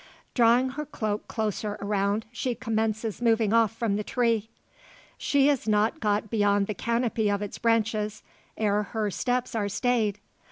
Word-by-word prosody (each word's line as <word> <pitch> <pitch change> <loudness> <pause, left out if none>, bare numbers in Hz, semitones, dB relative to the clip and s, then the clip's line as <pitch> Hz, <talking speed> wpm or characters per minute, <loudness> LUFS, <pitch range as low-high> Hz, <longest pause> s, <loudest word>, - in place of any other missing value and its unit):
Drawing 245 +2 +4
her 300 +4 -5
cloak 215 -6 -3
closer 215 -1 -2
around, 200 +1 0
she 245 +1 -2
commences 220 -2 -2
moving 225 -2 +3
off 230 -2 +4
from 225 -3 -1
the 210 - -2
tree. 230 -3 0 0.7
She 280 -1 +2
is 280 -6 +1
not 215 +1 +2
got 210 -1 0
beyond 205 -2 +2
the 215 - -3
canopy 230 -1 0
of 200 0 0
its 205 - -6
branches, 220 -2 0 0.3
ere 210 -1 +2
her 210 0 -2
steps 250 +4 -1
are 210 -3 -1
stayed. 215 -1 +1
220 Hz, 155 wpm, -27 LUFS, 210-235 Hz, 0.7 s, Drawing